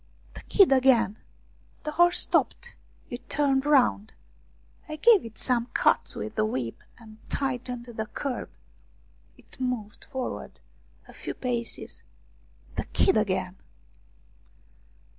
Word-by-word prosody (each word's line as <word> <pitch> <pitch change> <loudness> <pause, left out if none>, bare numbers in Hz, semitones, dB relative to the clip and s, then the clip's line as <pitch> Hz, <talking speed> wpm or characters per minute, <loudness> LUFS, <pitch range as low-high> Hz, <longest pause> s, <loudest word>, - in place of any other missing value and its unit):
The - - -10
kid 395 -8 +4
again! 255 -6 +4 0.6
The 300 - -3
horse 345 +3 +4
stopped; - - 0 0.4
it 245 0 -8
turned 280 -1 +1
round. 250 -7 +3 0.8
I 310 - -4
gave 425 +5 +5
it 225 -1 -10
some 240 -2 0
cuts - - +3
with 215 - -5
the 215 - +1
whip 130 - -3 0.2
and 220 -2 -15
tightened 250 -3 -2
the 220 -3 -5
curb. 265 +1 -4 0.9
It - - -19
moved 240 -5 -3
forward 260 -3 -5 0.5
a - - -14
few - - -6
paces 240 -2 -4 0.8
the - - -1
kid 380 - +2
again 190 -3 0
250 Hz, 120 wpm, -27 LUFS, 220-275 Hz, 0.9 s, gave